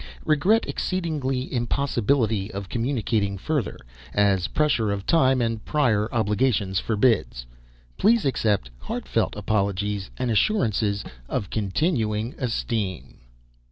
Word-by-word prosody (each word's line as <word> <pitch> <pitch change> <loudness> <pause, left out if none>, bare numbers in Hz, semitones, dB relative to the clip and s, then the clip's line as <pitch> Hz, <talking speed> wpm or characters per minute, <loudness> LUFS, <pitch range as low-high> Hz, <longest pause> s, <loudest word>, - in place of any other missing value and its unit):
Regret 185 +10 +3
exceedingly 145 -9 -2
impossibility 120 -4 0
of 100 -1 -6
communicating 115 -5 0
further, 135 - -2 0.4
as 100 -3 +3
pressure 145 -8 +1
of 100 -1 -3
time 130 -5 +3
and 115 -2 -1
prior 115 -8 +1
obligations 105 -3 +1
forbids. 105 - +1 0.5
Please 225 -1 +4
accept 105 - 0
heartfelt - - -2
apologies 100 -1 -1
and 125 -2 -1
assurances 110 - +1 0.3
of 100 - -3
continuing 110 - 0
esteem. 115 - -3
115 Hz, 100 wpm, -24 LUFS, 100-135 Hz, 0.5 s, Please